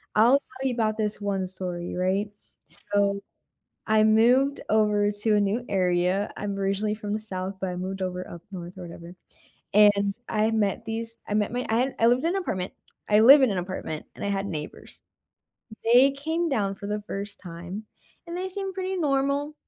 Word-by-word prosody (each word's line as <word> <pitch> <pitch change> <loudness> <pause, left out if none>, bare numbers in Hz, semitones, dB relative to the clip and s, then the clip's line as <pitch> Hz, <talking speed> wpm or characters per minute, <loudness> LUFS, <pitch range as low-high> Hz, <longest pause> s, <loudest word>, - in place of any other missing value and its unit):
I'll 240 +6 +6
tell 260 -1 -5
you 255 - 0
about 215 -2 0
this 210 -1 -2
one 195 -2 -1
story, 180 -2 -5
right? 190 +3 0 0.6
So, 200 0 +2 0.7
I 215 -1 +4
moved 245 +6 +4
over 210 -1 +3
to 210 +1 +1
a - - +3
new 205 +5 0
area, 185 +1 +1
I'm 200 -1 -3
originally 200 +2 0
from 210 -1 -5
the 215 - -1
south, 190 -2 -5
but 190 - -2
I 180 - -5
moved 190 +1 -4
over 180 0 -4
up 170 -1 -9
north 180 -1 -8
or 185 - -8
whatever, 170 0 -10 0.6
and 200 -1 +5
I 215 0 +1
met 220 +1 0
these 230 +1 -4
I 210 - -1
met 210 +1 +1
my 245 +1 -3
I 225 - +2
had 260 +3 0
I 230 - +5
lived 245 +2 +3
in 335 - +2
an 390 - 0
apartment 185 - -3 0.3
I 210 0 +5
live 275 +6 +9
in 250 - +4
an 195 - -1
apartment 175 -4 -5
and - - -7
I - - -1
had 195 0 -1
neighbors, 155 -5 -7 0.8
they 245 +4 +6
came 320 +5 -1
down 205 -8 0
for 200 - -8
the 210 0 -3
first 200 0 -5
time 175 +4 -7 0.4
and 340 +1 -5
they 370 - -2
seemed 385 0 -3
pretty 375 0 -2
normal, 285 -1 0
210 Hz, 195 wpm, -26 LUFS, 190-240 Hz, 0.8 s, live